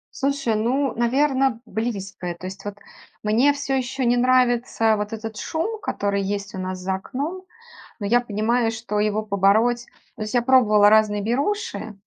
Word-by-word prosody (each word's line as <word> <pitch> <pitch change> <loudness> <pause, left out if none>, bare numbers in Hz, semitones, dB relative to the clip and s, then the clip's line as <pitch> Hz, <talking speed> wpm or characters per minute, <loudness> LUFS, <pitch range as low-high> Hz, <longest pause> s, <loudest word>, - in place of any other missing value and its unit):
Слушай, 275 -5 0
ну, 255 +4 0
наверно, 260 0 +1
близкое. 195 -5 -4
То 185 +2 -8
есть 190 +1 -9
вот 205 -1 -5 0.5
мне, 235 +7 +3
всё 280 -1 -2
ещё, 260 +1 -2
не 245 0 +3
нравится 245 -3 +3
вот 210 +1 -4
этот 220 -1 -6
шум, 390 +8 -3
который 200 - -1
есть 200 0 -4
у - - -5
нас 185 0 -4
за 190 +1 -2
окном. 295 - -5 0.6
Но 205 - -4
я 240 +4 +3
понимаю, 225 +1 0
что 220 -2 -3
его 215 +1 0
побороть 215 +4 +2 0.3
то 215 - -5
есть, 215 - -6
я 245 - +3
пробовала 220 -5 +5
разные 210 -1 +3
беруши. 245 - -2
225 Hz, 165 wpm, -23 LUFS, 205-255 Hz, 0.6 s, пробовала